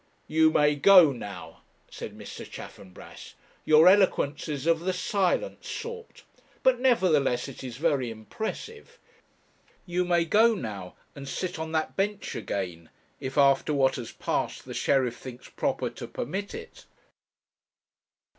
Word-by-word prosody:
'You 160 0 +4
may 150 -1 +3
go 165 +1 +7
now,' 95 -9 -9 0.3
said - - -9
Mr. - - -8
Chaffanbrass. 95 -1 -11 0.3
'Your 155 +2 +6
eloquence 185 -7 +3
is 145 -1 -4
of 165 -1 +3
the 185 +2 -1
silent 195 - -1
sort; 465 0 -7 0.4
but, 260 -2 +4
nevertheless, 160 - +2
it 135 -1 -10
is 125 -2 -7
very 140 -5 +1
impressive. 220 - -7 0.9
You 180 0 0
may 175 -1 +2
go 225 +6 +4
now, 100 - -6 0.2
and 140 -1 -9
sit 180 +2 -4
on 160 0 -4
that 160 -1 -1
bench 205 +1 -2
again, 85 -4 -5 0.3
if, 130 +2 -6
after 140 +1 +4
what 135 -1 +2
has 120 -3 -6
passed, - - -3
the - - -7
sheriff 130 -3 +1
thinks 125 -1 -10
proper - - -2
to - - -8
permit 195 +5 -5
it.' - - -11
155 Hz, 135 wpm, -27 LUFS, 130-185 Hz, 0.9 s, go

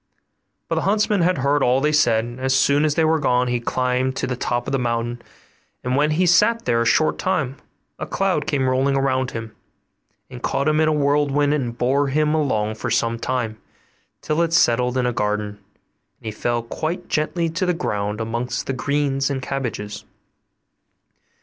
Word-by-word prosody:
But - - -2
the - - 0
huntsman 210 -1 +1
had 180 +1 +2
heard 140 +2 +1
all 125 +1 +3
they 150 +2 +1
said; 120 -7 +3
and 120 +1 -9
as 130 0 +1
soon 140 +3 +3
as 150 -1 +1
they 160 - +3
were 160 0 +2
gone, 125 -3 +1
he 120 0 0
climbed 125 +2 -1
to - - -2
the 125 - -2
top 120 0 -2
of - - -2
the 135 - +1
mountain, 120 0 -2 0.6
and 125 +1 -1
when 150 +2 +2
he 155 +4 +1
had 180 - +3
sat 230 +6 +3
there 115 -1 +2
a 115 - +1
short 155 - +2
time 140 -8 -1 0.4
a - - -4
cloud 185 -7 0
came 140 -4 0
rolling 135 +2 +1
around 130 -1 0
him, 115 -2 -7 0.7
and 125 -2 -10
caught 140 +3 -1
him 155 0 +2
in 155 - +3
a - - +3
whirlwind 145 0 +2
and 120 -5 -2
bore 135 +4 +1
him 150 +2 +1
along 110 -9 0
for 110 +2 -5
some 115 0 0
time, 115 -4 -2 0.6
till 155 +2 0
it 165 -1 0
settled 125 -5 +3
in 125 - +1
a 125 - 0
garden, 105 -1 -1
and 100 +2 -30
he 110 - -3
fell 120 +2 -2
quite 160 +9 -4
gently 165 +2 0
to 180 +3 -2
the - - +3
ground 105 - -2
amongst 120 +2 -3
the 135 - -2
greens 140 +1 0
and 135 -2 -3
cabbages. 110 -7 -4
130 Hz, 195 wpm, -21 LUFS, 120-150 Hz, 0.7 s, all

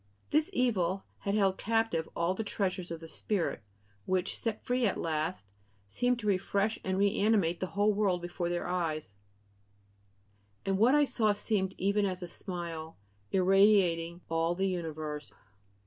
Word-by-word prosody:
This 310 +4 +3
evil 195 - +1 0.2
had 200 0 -1
held 195 -3 +2
captive 225 -7 0
all 170 +2 +1
the 220 - -3
treasures 185 -4 -2
of 165 -1 -6
the 165 - -8
spirit, 180 - -2 0.5
which, 185 0 0
set 225 -2 -3
free 250 -1 +2
at 195 - -1
last, 160 - -2 0.4
seem 245 - +1
to 220 - -7
refresh 200 +2 +1
and 190 0 -1
reanimate 200 -3 +2
the 185 - -2
whole 210 +1 +4
world 200 -3 +1
before 175 0 -3
their 175 0 -2
eyes: 160 - -2 1.5
"And 195 0 +1
what 245 +6 +6
I 295 0 +5
saw 215 -6 +2
seemed 200 -2 -1
even 200 +1 +2
as 185 -1 -3
a - - -5
smile. 170 -3 -6 0.3
Irradiating 185 -3 +4
all 165 +1 +1
the 190 +2 +1
universe...." 155 -4 -4
190 Hz, 150 wpm, -31 LUFS, 170-210 Hz, 1.5 s, what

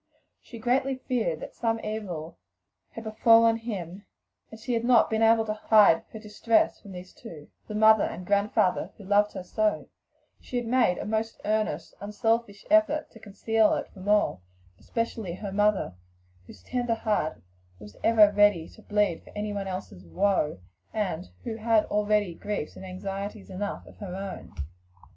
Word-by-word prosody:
She 235 - -11
greatly 260 +4 +1
feared 235 - -2
that - - -8
some 225 -1 -1
evil 185 - -5 0.5
had 225 - -7
befallen 225 +1 +5
him, 200 -4 -6 0.4
and 220 - -12
had 230 0 -2
not 240 -2 +4
been 220 0 +1
able 225 0 +5
to 215 - -2
hide 215 -5 +4
her - - -8
distress 215 +1 +1
from 200 - -11
these 180 0 -10
two 150 -3 -12 0.2
the 210 - -6
mother 220 0 +6
and 180 - -6
grandfather 200 -1 +1
who 205 - -12
loved 205 +2 +2
her - - -6
so 215 +3 -1 0.6
though 245 -1 -1
making 235 -7 +1
most 220 +1 -2
earnest, 210 -7 -1
unselfish 210 0 -1
efforts 315 -1 +3
to 225 - -13
conceal 220 +1 +1
it - - -4
from 195 +1 -7
all, 205 - +2 0.4
especially 225 -6 -3
her 200 +1 -6
mother, 205 - +1 0.5
whose 90 - -14
tender 245 - -1
heart 210 -8 -1 0.4
was 105 +1 -13
ever 215 -2 +6
ready 205 -5 +3
to 220 - -17
bleed 205 -5 0
for - - -16
another's 195 - -5
woe, 155 - +1 0.3
and 185 -5 -3
who 225 -3 -4
had 225 -1 +2
already 210 -3 +1
griefs 200 -3 -5
and 190 - -9
anxieties 195 +2 -6
enough 200 +2 -4
of - - -16
her 185 -3 -7
own. 195 0 -7
210 Hz, 155 wpm, -27 LUFS, 190-225 Hz, 0.6 s, mother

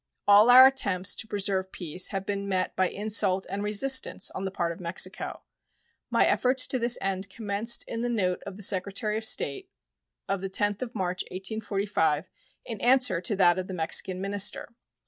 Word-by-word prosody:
All 205 +3 +7
our 255 +1 +10
attempts 200 -9 +2
to 220 - -6
preserve 195 -2 -1
peace 180 0 -2
have 195 -1 -4
been 200 0 -3
met 185 -1 -1
by 185 -1 +1
insult 200 -2 0
and 200 +1 -3
resistance 235 +6 0
on 190 - -5
the - - -1
part 170 -3 -2
of 170 - -9
Mexico. 170 0 -2 0.7
My - - +3
efforts 255 0 +2
to 255 - -2
this 240 0 +1
end 195 0 -3
commenced 215 +3 -1
in 230 - -4
the 245 - -1
note 185 -6 -1
of 200 - -7
the 210 - -7
Secretary 200 +3 0
of 220 0 -3
State 385 - 0 0.6
of 195 -1 -2
the 195 - -4
10th 205 +2 -1
of 245 -2 -6
March, 185 -2 -2
1845, 195 -5 -2 0.3
in 225 -4 -7
answer 250 -7 +3
to 185 +4 0
that 180 -1 +4
of 185 - -5
the 190 - -6
Mexican 180 +2 -1
minister. 200 +3 -2
200 Hz, 185 wpm, -27 LUFS, 185-220 Hz, 0.7 s, our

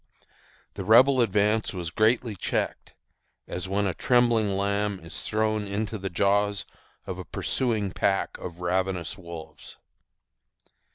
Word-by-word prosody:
The 100 - -5
Rebel 125 +6 +6
advance 105 -1 +1
was 85 -2 -4
greatly 110 +3 +2
checked, 90 - -3 0.5
as 90 +1 -5
when 100 +1 +1
a 95 - 0
trembling 120 -1 +3
lamb 100 0 0
is 85 - -6
thrown 110 -1 0
into 105 +2 -3
the 95 0 -3
jaws 100 +2 +1 0.4
of - - -5
a - - -5
pursuing 110 -6 -1
pack 95 +1 0
of 85 0 -8
ravenous 90 0 -1
wolves. 85 -4 -10
100 Hz, 125 wpm, -26 LUFS, 95-110 Hz, 0.5 s, Rebel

